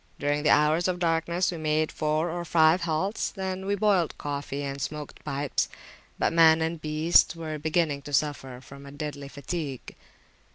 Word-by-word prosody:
During 145 +1 0
the 150 - +2
hours 155 +4 +4
of 180 -1 -1
darkness 170 +1 0
we 170 - -5
made 155 0 0
four 155 +2 -1
or 175 +1 -4
five 165 +1 +4
halts, 175 +6 -1
when 190 -1 -4
we 200 - +1
boiled 195 -5 +1
coffee 145 -1 -4
and 140 0 -5
smoked 150 +1 -6
pipes; 140 -2 -1 0.5
but - - +1
man 165 -1 +6
and 160 0 -2
beasts 155 +3 +3
were 155 -2 -5
beginning 155 -2 0
to 145 - -10
suffer 135 -4 -1
from 140 +1 -12
a - - -10
deadly 145 -1 -6
fatigue. 140 -1 -6
155 Hz, 170 wpm, -27 LUFS, 145-170 Hz, 0.5 s, man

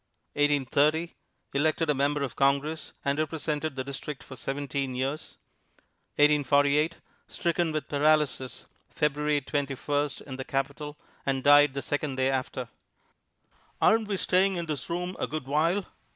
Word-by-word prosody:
1830 145 +3 +2 0.4
Elected 155 +3 +1
a 150 - +3
Member 140 +1 +1
of 130 -3 -4
Congress, 140 +3 +1
and 140 +1 +1
represented 155 -1 -2
the 130 - -2
district 140 +1 -6
for 130 - -10
seventeen 135 0 -3
years. 135 +4 -3 0.8
1848 145 +1 +3 0.3
Stricken 170 -1 0
with 155 -1 -3
paralysis 145 -3 +1 0.2
February 150 0 0
Twenty 140 0 -2
first 145 +1 -1
in 130 -2 -8
the 130 - -4
Capitol, 140 +3 -3 0.3
and 135 -1 -1
died 145 -1 +6
the 140 - -3
second 145 -2 -2
day 130 +1 +1
after. 130 -1 -2 1.1
"Aren't 220 0 +4
we 200 -2 -1
staying 190 +1 +2
in 170 -1 -2
this 150 -5 -4
room 180 +2 -3
a - - -1
good 155 -3 -4
while?" 165 +7 +1
145 Hz, 140 wpm, -28 LUFS, 140-155 Hz, 1.1 s, died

